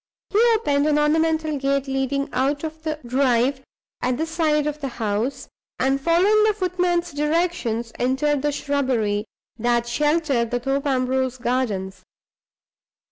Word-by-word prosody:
He 410 Hz, -, +2 dB, 0.2 s
opened 290 Hz, -9 st, +1 dB
an 300 Hz, -1 st, +3 dB
ornamental 315 Hz, 0 st, +1 dB
gate 275 Hz, 0 st, 0 dB
leading 270 Hz, +1 st, -1 dB
out 275 Hz, +4 st, 0 dB
of 315 Hz, 0 st, -6 dB
the 310 Hz, -1 st, -3 dB
drive 255 Hz, +1 st, +1 dB, 0.4 s
at 250 Hz, 0 st, 0 dB
the 320 Hz, -, -1 dB
side 315 Hz, -2 st, +1 dB
of 300 Hz, 0 st, -3 dB
the 275 Hz, -, -2 dB
house, 230 Hz, +2 st, -2 dB, 0.3 s
and, 270 Hz, +1 st, +1 dB
following 370 Hz, +7 st, +4 dB
the 430 Hz, -1 st, +3 dB
footman's 355 Hz, -2 st, 0 dB
directions, 295 Hz, -7 st, -1 dB
entered 265 Hz, +3 st, +1 dB
the 295 Hz, +1 st, 0 dB
shrubbery 255 Hz, -8 st, -1 dB, 0.3 s
that 240 Hz, +1 st, +1 dB
sheltered 295 Hz, -2 st, +1 dB
the 245 Hz, +1 st, -1 dB
Thorpe 270 Hz, +3 st, -1 dB
Ambrose 260 Hz, -1 st, 0 dB
gardens. 205 Hz, -7 st, -2 dB
275 Hz, 135 wpm, -22 LUFS, 250-310 Hz, 0.4 s, following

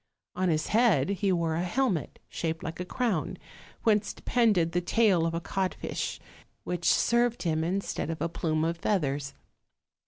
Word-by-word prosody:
On 185 Hz, 0 st, +1 dB
his 155 Hz, -1 st, 0 dB
head 210 Hz, -, +3 dB
he 200 Hz, 0 st, +1 dB
wore 170 Hz, -3 st, +1 dB
a 165 Hz, -, 0 dB
helmet 190 Hz, -, -1 dB
shaped 160 Hz, -1 st, -3 dB
like 165 Hz, -2 st, -5 dB
a 180 Hz, -, -3 dB
crown, 220 Hz, -5 st, -1 dB, 0.5 s
whence 210 Hz, -2 st, +2 dB
depended 210 Hz, -9 st, +2 dB
the 175 Hz, -, 0 dB
tail 185 Hz, -3 st, +3 dB
of 165 Hz, -, -2 dB
a -, -, 0 dB
codfish, 190 Hz, +2 st, -3 dB, 0.4 s
which 175 Hz, -1 st, 0 dB
served 240 Hz, 0 st, +2 dB
him 160 Hz, -2 st, 0 dB
instead 185 Hz, -2 st, -2 dB
of 165 Hz, -, -3 dB
a 165 Hz, -, 0 dB
plume 160 Hz, -1 st, -1 dB
of 165 Hz, +1 st, -2 dB
feathers. 145 Hz, -8 st, -1 dB
175 Hz, 160 wpm, -28 LUFS, 165-205 Hz, 0.5 s, head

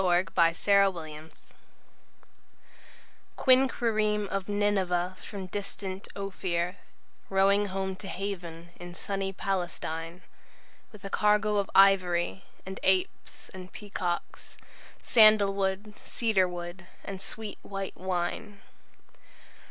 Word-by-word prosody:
Cargoes 180 Hz, 0 st, +2 dB
By 165 Hz, -2 st, +5 dB
John 200 Hz, +2 st, +3 dB
Masefield 155 Hz, -1 st, -8 dB, 2.1 s
QUINQUIREME 220 Hz, -6 st, +3 dB
of 195 Hz, 0 st, -3 dB
Nineveh 190 Hz, -3 st, +1 dB
from 200 Hz, -3 st, -7 dB
distant 190 Hz, 0 st, -5 dB
Ophir, 185 Hz, -2 st, -2 dB, 0.5 s
Rowing 195 Hz, +1 st, +3 dB
home 190 Hz, 0 st, -3 dB
to 195 Hz, -, -8 dB
haven 175 Hz, -4 st, -5 dB
in 175 Hz, 0 st, -9 dB
sunny 195 Hz, 0 st, -3 dB
Palestine, 175 Hz, -3 st, -3 dB, 0.7 s
With 210 Hz, -3 st, -13 dB
a 195 Hz, -, -6 dB
cargo 210 Hz, 0 st, +3 dB
of 200 Hz, -1 st, 0 dB
ivory, 190 Hz, -2 st, +4 dB, 0.2 s
And 190 Hz, +1 st, -6 dB
apes 190 Hz, -1 st, 0 dB
and 185 Hz, -1 st, -10 dB
peacocks, 180 Hz, -4 st, -5 dB, 0.5 s
Sandalwood, 205 Hz, -2 st, +4 dB
cedarwood, 180 Hz, -5 st, -1 dB, 0.2 s
and 195 Hz, -1 st, -6 dB
sweet 215 Hz, +1 st, -6 dB
white 195 Hz, -1 st, -5 dB
wine. 185 Hz, +3 st, -3 dB
195 Hz, 95 wpm, -29 LUFS, 180-205 Hz, 2.1 s, By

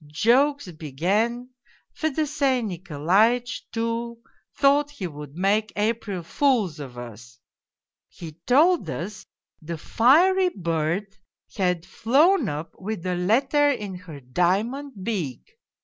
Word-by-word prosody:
Jokes 240 Hz, -, +2 dB
began. 195 Hz, -, -1 dB, 0.4 s
Fedosey 285 Hz, -4 st, 0 dB
Nikolaitch, 195 Hz, +6 st, 0 dB
too, 230 Hz, +1 st, -3 dB, 0.4 s
thought 285 Hz, +1 st, +3 dB
he 285 Hz, -10 st, -7 dB
would 150 Hz, -3 st, -8 dB
make 205 Hz, +4 st, +1 dB
April 210 Hz, -3 st, -2 dB
fools 215 Hz, -, +1 dB
of 130 Hz, -4 st, -8 dB
us. 120 Hz, +1 st, -10 dB, 0.7 s
He 165 Hz, -3 st, -9 dB, 0.2 s
told 320 Hz, +8 st, +4 dB
us 195 Hz, +4 st, -6 dB, 0.3 s
the 165 Hz, +1 st, -5 dB
fiery 350 Hz, -, +4 dB
bird 170 Hz, -, -2 dB, 0.4 s
had 180 Hz, -3 st, 0 dB
flown 270 Hz, -, +3 dB
up 150 Hz, +3 st, -5 dB
with 195 Hz, -2 st, -5 dB
a 180 Hz, -, 0 dB
letter 265 Hz, +11 st, +2 dB
in 210 Hz, -8 st, -3 dB
her 180 Hz, -5 st, -10 dB
diamond 195 Hz, -, -1 dB
beak! 205 Hz, -, -4 dB
210 Hz, 110 wpm, -24 LUFS, 170-265 Hz, 0.7 s, told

